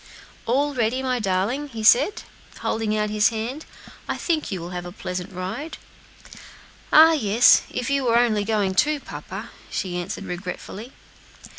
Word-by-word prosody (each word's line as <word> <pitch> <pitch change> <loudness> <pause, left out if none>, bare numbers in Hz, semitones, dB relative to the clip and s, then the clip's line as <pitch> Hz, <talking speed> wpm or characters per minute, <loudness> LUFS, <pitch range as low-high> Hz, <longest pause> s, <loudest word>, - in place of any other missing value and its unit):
"All 285 +5 +1
ready, 250 +1 0
my 255 -1 0
darling?" 210 +8 -1
he 230 -5 -7
said, 275 - +4 0.3
holding 215 -1 -1
out 210 0 -1
his 210 0 +4
hand; 235 +7 -5 0.4
"I - - -1
think 320 -8 -1
you 190 - -3
will 170 +1 -7
have 180 -1 -5
a - - -8
pleasant 180 0 -5
ride." 190 - -5 1.1
"Ah! 320 +1 +8
yes, 235 -6 +5
if 250 -1 -4
you 275 -1 +1
were 235 -1 +3
only 225 -4 +2
going 205 -3 0
too, 295 +9 +2
papa," - - -8 0.2
she 180 -3 -3
answered 185 +3 -5
regretfully. 190 +6 -7
220 Hz, 155 wpm, -23 LUFS, 195-265 Hz, 1.1 s, Ah